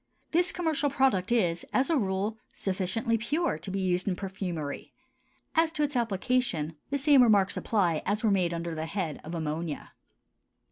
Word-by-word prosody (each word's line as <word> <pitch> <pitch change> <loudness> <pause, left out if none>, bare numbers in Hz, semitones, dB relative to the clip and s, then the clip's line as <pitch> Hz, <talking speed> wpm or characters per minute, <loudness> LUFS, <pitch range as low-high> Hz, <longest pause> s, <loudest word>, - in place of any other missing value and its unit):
This 350 +2 +3
commercial 315 -5 0
product 260 -8 +2
is, 175 -8 +2
as 265 +5 +2
a - - +4
rule, 205 -2 -1 0.2
sufficiently 200 +5 -1
pure 290 - 0
to 180 - -7
be 195 +1 -2
used 180 0 0
in 190 - +1
perfumery; 180 -7 -5 0.6
as 325 -1 +3
to 300 - 0
its 290 -1 -1
application 215 -7 0
the 280 - 0
same 285 -1 +5
remarks 205 -5 +4
apply 180 -8 +1
as 210 +2 -1
were 220 - +3
made 180 -3 +2
under 170 0 -3
the 160 0 -3
head 170 -5 -3
of 165 +2 -6
ammonia. 160 -1 -3
195 Hz, 170 wpm, -29 LUFS, 175-255 Hz, 0.6 s, same